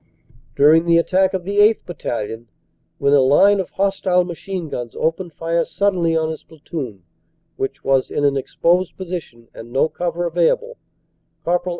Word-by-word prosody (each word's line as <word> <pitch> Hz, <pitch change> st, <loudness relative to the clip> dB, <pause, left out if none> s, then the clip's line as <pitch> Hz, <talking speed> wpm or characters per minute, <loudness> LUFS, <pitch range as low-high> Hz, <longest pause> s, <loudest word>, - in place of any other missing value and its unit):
During 155 Hz, +4 st, +5 dB
the 170 Hz, 0 st, +5 dB
attack 190 Hz, +3 st, +2 dB
of 185 Hz, -, -3 dB
the 200 Hz, +3 st, -4 dB
8th. 210 Hz, +2 st, +4 dB
Battalion, 115 Hz, -8 st, -5 dB, 0.5 s
when 140 Hz, -, +2 dB
a 145 Hz, -, +6 dB
line 195 Hz, +10 st, +5 dB
of 190 Hz, -, -3 dB
hos 195 Hz, 0 st, -1 dB
tile 180 Hz, -1 st, +2 dB
machine 175 Hz, 0 st, -5 dB
guns 120 Hz, -5 st, -6 dB
opened 165 Hz, +2 st, -2 dB
fire 165 Hz, +2 st, 0 dB
suddenly 180 Hz, -5 st, 0 dB
on 160 Hz, 0 st, 0 dB
his 160 Hz, -, -7 dB
platoon, 140 Hz, -, -8 dB, 0.5 s
which 135 Hz, +3 st, -4 dB
was 135 Hz, -1 st, +1 dB
in 145 Hz, -, -1 dB
an 140 Hz, -1 st, +2 dB
exposed 175 Hz, +6 st, 0 dB
position 170 Hz, -11 st, -7 dB
and 115 Hz, +1 st, -11 dB
no 135 Hz, +5 st, +2 dB
cover 175 Hz, 0 st, -3 dB
available, 175 Hz, -, 0 dB, 0.7 s
Cpl. 175 Hz, +1 st, 0 dB
170 Hz, 165 wpm, -20 LUFS, 140-185 Hz, 0.7 s, a